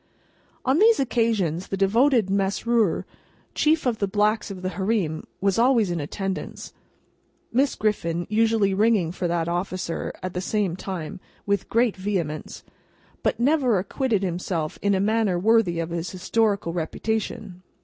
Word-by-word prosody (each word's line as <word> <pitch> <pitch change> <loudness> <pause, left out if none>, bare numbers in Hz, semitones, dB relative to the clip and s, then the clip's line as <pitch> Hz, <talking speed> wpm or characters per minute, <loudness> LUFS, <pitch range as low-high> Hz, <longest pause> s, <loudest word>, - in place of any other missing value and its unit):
On 265 +5 +3
these 445 +2 +5
occasions, 220 - 0
the 195 - -3
devoted 230 +3 +3
Mesrour, 200 +1 +1 0.5
chief 310 0 +2
of 240 -3 0
the 200 - +1
Blacks 210 +2 +1
of 185 -2 -8
the 185 - -1
Hareem, 190 -6 -1 0.2
was 195 +1 +2
always 235 -6 +3
in 170 - -2
attendance 190 +6 -5 0.8
(Miss 270 +3 +2
Griffin 175 -5 -1
usually 220 -2 +2
ringing 205 -4 +2
for 180 0 -2
that 170 -1 -1
officer, 175 0 -3
at 185 -1 -4
the 180 - -2
same 195 -2 0
time, 185 -3 -6 0.3
with 200 -1 -1
great 230 -1 +2
vehemence), 185 -6 -3 0.6
but - - 0
never 260 -4 +3
acquitted 205 +2 -1
himself 175 -3 -2
in 200 -1 +2
a - - +1
manner 210 -2 +1
worthy 205 -2 +3
of 165 0 -3
his 170 +1 -3
historical 200 -1 0
reputation. 190 +2 -3
200 Hz, 145 wpm, -24 LUFS, 180-225 Hz, 0.8 s, these